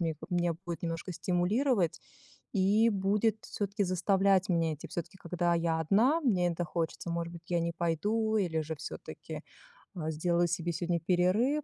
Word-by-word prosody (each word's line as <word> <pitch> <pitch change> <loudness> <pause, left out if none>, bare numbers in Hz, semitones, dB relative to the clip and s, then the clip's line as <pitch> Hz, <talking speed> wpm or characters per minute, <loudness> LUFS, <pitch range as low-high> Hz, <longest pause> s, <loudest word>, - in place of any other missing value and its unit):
мне 165 -2 0
меня 175 -2 +1
будет 170 -2 -5
немножко 165 +2 -3
стимулировать 185 - +1 0.5
и 205 +3 +4
будет 205 +2 +1
всё-таки 200 0 -2
заставлять 190 +1 +2
меня 165 -3 +1
идти. 150 - -9
Всё-таки, 170 +2 -6
когда 175 0 0
я 165 -1 +1
одна, 230 - +3
мне 185 - +2
это 175 +1 -2
хочется, 165 +1 -3
может 170 0 -2
быть, 170 0 -10
я 175 -1 +2
не 170 0 -1
пойду 215 +7 0
или 170 -6 +1
же 155 +1 -3
всё-таки, - - -7 0.5
а, 160 -2 -2
сделаю 175 +2 +1
себе 170 +1 -1
сегодня 170 +1 -1
перерыв. 185 - +2
175 Hz, 160 wpm, -31 LUFS, 170-200 Hz, 0.5 s, и